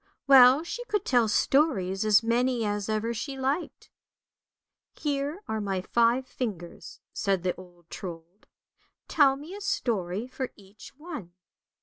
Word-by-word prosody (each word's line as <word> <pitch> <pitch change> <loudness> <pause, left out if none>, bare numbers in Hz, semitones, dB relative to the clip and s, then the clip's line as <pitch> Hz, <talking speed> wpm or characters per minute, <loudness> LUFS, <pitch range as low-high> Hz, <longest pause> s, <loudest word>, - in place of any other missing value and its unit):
Well 265 +1 +7
she 480 +8 -5
could 420 -4 -2
tell 245 -4 +3
stories 210 - +1
as 215 +1 +4
many 240 0 +1
as 205 0 -2
ever 220 +2 -1
she 270 +5 -5
liked. 275 +6 -3 0.5
" - - -65 0.3
Here 290 +5 -2
are 220 -1 -2
my 195 -2 -2
five 235 +6 +2
fingers," 205 -10 -6
said 195 -3 -1
the 180 -1 0
old 175 -2 -16
Trold, 170 +1 -9 0.2
" - - -43
tell 280 -3 +4
me 300 +6 -10
a 410 - -8
story 220 - -2
for 255 0 -5
each 200 +1 -15
one." 295 - -8
235 Hz, 145 wpm, -27 LUFS, 195-275 Hz, 0.5 s, Well